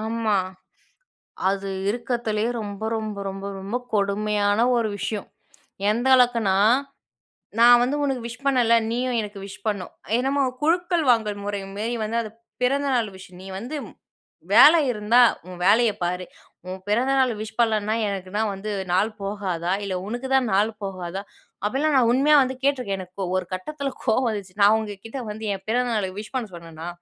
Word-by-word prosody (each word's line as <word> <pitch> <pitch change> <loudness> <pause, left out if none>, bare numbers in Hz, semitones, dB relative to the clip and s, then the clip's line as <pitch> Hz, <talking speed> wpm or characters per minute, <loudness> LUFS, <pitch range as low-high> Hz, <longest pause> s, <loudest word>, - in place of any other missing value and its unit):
ஆமா, 220 -1 0 1.1
அது 195 0 -2 0.2
இருக்கிறதிலயே 230 -1 -1
ரொம்ப, 205 0 -6
ரொம்ப, 215 -2 -5
ரொம்ப, 195 +1 -7
ரொம்ப 200 +5 -3 0.2
கொடுமையான 205 0 +1 0.2
ஒரு 230 -2 +1
விஷயம். 205 +1 -4 0.6
எந்த 235 +4 0
அளவுக்குனா, 235 -6 +3 1.0
நான் 240 +1 +8
வந்து 260 +4 0
உனக்கு 270 -3 -1
விஷ் 245 +4 -8
பண்ணல, 250 -4 +3 0.2
நீயும் 245 0 -1
எனக்கு 205 -1 -7
விஷ் 195 - -11
பண்ணணும். 200 -4 -3 0.2
என்னமோ 270 +3 +1 0.2
குழுக்கள் 345 +1 +2
வாங்கும் 210 -3 0
முறை 205 -1 -2
மாரி 225 +4 -2
வந்து, 225 +2 -2
அது 215 - -7 0.3
பிறந்தநாள் 255 -3 +1
விஷ். 190 -1 -13
நீ 190 - -10
வந்து 245 +8 -6 0.8
வேலை 330 +3 +9
இருந்தா, 220 +2 +3 0.3
உன் 180 -1 -9
வேலைய 220 +3 +5
பாரு. 180 +1 -2 0.4
உன் 185 +1 -5
பிறந்தநாள் 255 +3 +2
விஷ் 220 0 -8
பண்ணலனா, 215 -2 +2
எனக்கு 195 -2 -4
தான் 220 0 +1
வந்து 200 +2 -5 0.2
நாள் 205 +5 +2
போகாதா! 190 -4 -2
இல்ல 195 -2 -3
உனக்கு 240 +4 -4
தான் 260 -3 +2
நாள் 205 +3 +3
போகாதா! 190 -1 -5 0.4
அப்படிலாம் 280 +7 +1
நான் 240 -3 +4
உண்மையா 285 +4 +4
வந்து 260 0 -3
கேட்டுருக்கேன். 250 -9 0
எனக்கு 185 +1 -8
ஒரு 185 -1 0
கட்டத்தில 275 +9 -4
கோவம் 250 +1 +2
வந்துச்சு. 200 -4 -5
நான் 205 +2 +7
உங்க 215 -2 -4
கிட்ட 225 +4 -6
வந்து 220 +1 -7
என் 195 -1 -8
பிறந்த 245 +2 +1
நாள் 190 -3 -2
விஷ் 210 +4 -9
பண்ண 245 -4 -1
சொன்னேனா, 165 -1 -9
215 Hz, 160 wpm, -24 LUFS, 200-245 Hz, 1.1 s, வேலை